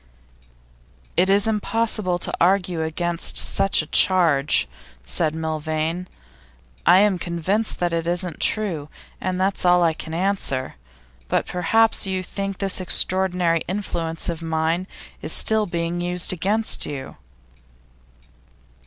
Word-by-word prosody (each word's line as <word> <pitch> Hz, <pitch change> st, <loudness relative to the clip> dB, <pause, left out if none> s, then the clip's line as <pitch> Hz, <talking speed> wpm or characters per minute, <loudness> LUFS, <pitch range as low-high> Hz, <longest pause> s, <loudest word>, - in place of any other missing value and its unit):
'It's 195 Hz, +2 st, +3 dB
impossible 215 Hz, -3 st, -1 dB
to -, -, -3 dB
argue 180 Hz, -2 st, +2 dB
against 170 Hz, +2 st, -1 dB
such 195 Hz, -, +2 dB
a -, -, -9 dB
charge,' 160 Hz, -, +3 dB, 0.4 s
said 155 Hz, -, -1 dB
Milvain. 160 Hz, +2 st, -3 dB, 0.8 s
'I -, -, +7 dB
am 200 Hz, -2 st, +3 dB
convinced 180 Hz, +6 st, -1 dB
it 175 Hz, -1 st, 0 dB
isn't 175 Hz, -1 st, -1 dB
true, 175 Hz, -9 st, -1 dB, 0.3 s
and 185 Hz, 0 st, -2 dB
that's 190 Hz, +1 st, 0 dB
all 180 Hz, -1 st, +4 dB
I 165 Hz, -1 st, +3 dB
can 160 Hz, 0 st, -7 dB
answer. 175 Hz, -8 st, -1 dB, 0.5 s
But -, -, 0 dB
perhaps 220 Hz, +5 st, +2 dB
you 190 Hz, -1 st, -2 dB
think 195 Hz, +1 st, -5 dB
this 195 Hz, -1 st, 0 dB
extraordinary 180 Hz, -2 st, +1 dB
influence 170 Hz, -4 st, -3 dB
of 170 Hz, -1 st, -3 dB
mine 165 Hz, +2 st, -1 dB, 0.3 s
is -, -, +2 dB
still 220 Hz, -1 st, +3 dB
being 170 Hz, 0 st, -3 dB
used 180 Hz, +1 st, +2 dB
against 205 Hz, +6 st, 0 dB
you? 135 Hz, -2 st, -7 dB
180 Hz, 120 wpm, -22 LUFS, 165-195 Hz, 0.8 s, I